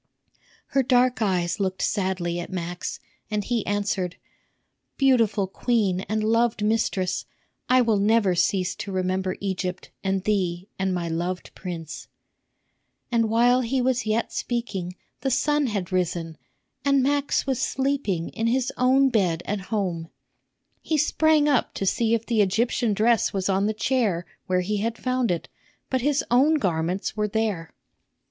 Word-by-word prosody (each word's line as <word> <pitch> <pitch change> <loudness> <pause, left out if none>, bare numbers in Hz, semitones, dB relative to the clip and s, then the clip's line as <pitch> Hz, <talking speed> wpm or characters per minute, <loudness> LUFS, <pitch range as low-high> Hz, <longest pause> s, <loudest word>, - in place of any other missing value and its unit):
Her 275 - +3
dark 250 -1 +2
eyes 180 -2 0
looked 190 -1 -1
sadly 185 -4 -1
at 175 - -6
Max, 175 -1 -4 0.3
and 210 -1 -1
he 235 0 -1
answered, 200 -3 -1 0.8
"Beautiful 230 -7 +3
queen 195 -2 0
and 215 0 0
loved 230 0 +2
mistress, 210 -4 0 0.4
I 255 0 +6
will 225 -4 +2
never 205 -2 +3
cease 180 +1 +1
to 200 - -5
remember 185 0 -1
Egypt 185 -2 -3
and 195 -1 0
thee 185 -3 -1
and 190 0 0
my 175 -2 -2
loved 175 +3 -3
prince." 170 -4 -7 1.0
And 230 -2 +2
while 245 +3 +4
he 255 +2 -1
yet 245 -3 +1
was - - -19
speaking 195 -7 -3 0.2
the 270 - -1
sun 290 +2 +2
had 200 -6 -3
risen, 170 -3 -1 0.5
and 275 -1 +3
Max 285 +1 +1
was 265 -3 -1
sleeping 265 -11 -1
in 225 0 -2
his 255 +1 0
own 265 +2 +4
bed 180 -8 +1
at 205 0 -2
home. 180 -7 -2 0.7
He 315 - 0
sprang 305 0 +3
up 280 -5 +1
to 195 - -2
see 230 +4 +2
if 230 0 -3
the 230 -3 +2
Egyptian 220 +2 +1
dress 225 +2 +2
was 195 -1 -1
on 195 +1 +2
the - - +1
chair 215 -5 0 0.2
where 185 0 +2
he 205 +3 -1
had 225 +3 -2
found 255 -1 0
it, 175 -2 -1 0.4
but 260 -1 +1
his 285 +2 +1
own 275 +6 +5
garments 180 - -1
were 210 -1 0
there. 210 -6 -2
210 Hz, 155 wpm, -25 LUFS, 185-245 Hz, 1.0 s, I